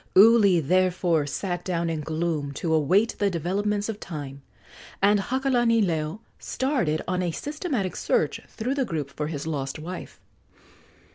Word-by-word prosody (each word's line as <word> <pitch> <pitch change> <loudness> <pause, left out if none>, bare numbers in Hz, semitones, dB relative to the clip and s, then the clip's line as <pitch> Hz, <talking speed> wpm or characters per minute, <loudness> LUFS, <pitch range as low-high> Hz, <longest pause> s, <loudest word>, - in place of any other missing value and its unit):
Uli, 205 -3 +7
therefore, 175 -1 +2
sat 175 +3 -3
down 170 -2 -1
in 160 -2 -2
gloom 155 -2 -2
to 160 +3 -1
await 180 +9 +3
the 205 -1 +3
developments 200 +4 -1
of 220 -2 -4
time, 145 -6 -7 0.6
and 205 +1 +4
Hakalanileo 230 - +1 0.2
started 250 - -1
on 180 +1 0
a 180 - 0
systematic 280 - -3
search - - 0
through 240 +4 -3
the 280 -1 0
group 150 - -3
for 150 - -3
his 150 -2 -4
lost 140 -3 -3
wife. 175 +4 -8
180 Hz, 140 wpm, -25 LUFS, 155-210 Hz, 0.6 s, Uli